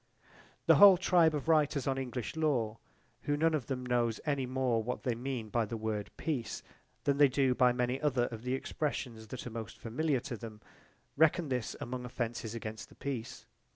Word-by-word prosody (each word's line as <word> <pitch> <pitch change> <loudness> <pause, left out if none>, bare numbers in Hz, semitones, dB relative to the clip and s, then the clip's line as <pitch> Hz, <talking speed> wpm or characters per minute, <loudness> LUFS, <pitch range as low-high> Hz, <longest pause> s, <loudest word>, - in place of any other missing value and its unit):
The - - +6
whole 200 -2 +9
tribe 170 -3 +4
of 145 +1 -4
writers 150 -4 +3
on 135 -1 0
English 125 -1 -4
law, 125 -9 0 0.5
who 145 0 +1
none 165 +2 +3
of 145 -6 -1
them 125 -2 -3
knows 120 -2 +1
any 140 -4 0
more 130 -3 +1
what 125 +3 -4
they 125 - +1
mean 120 -2 -4
by 115 +2 +1
the 115 +2 -5
word 110 -2 -3
"peace" 130 -9 -3 0.4
than 140 -1 +2
they 145 0 +7
do 135 -1 +2
by 125 -1 +4
many 125 +2 -1
other 130 -5 +2
of 115 -1 -7
the 125 +2 -1
expressions 125 -5 -4
that 130 - -7
are 125 - -6
most 110 -1 -6
familiar 135 +4 0
to 130 -3 -5
them, 110 -1 -9 0.6
reckon 160 +1 +3
this 125 -3 -2
among 125 +1 -5
offences 115 -2 -4
against 110 -1 -6
the - - -17
peace. 125 -4 -5
125 Hz, 190 wpm, -32 LUFS, 115-145 Hz, 0.6 s, whole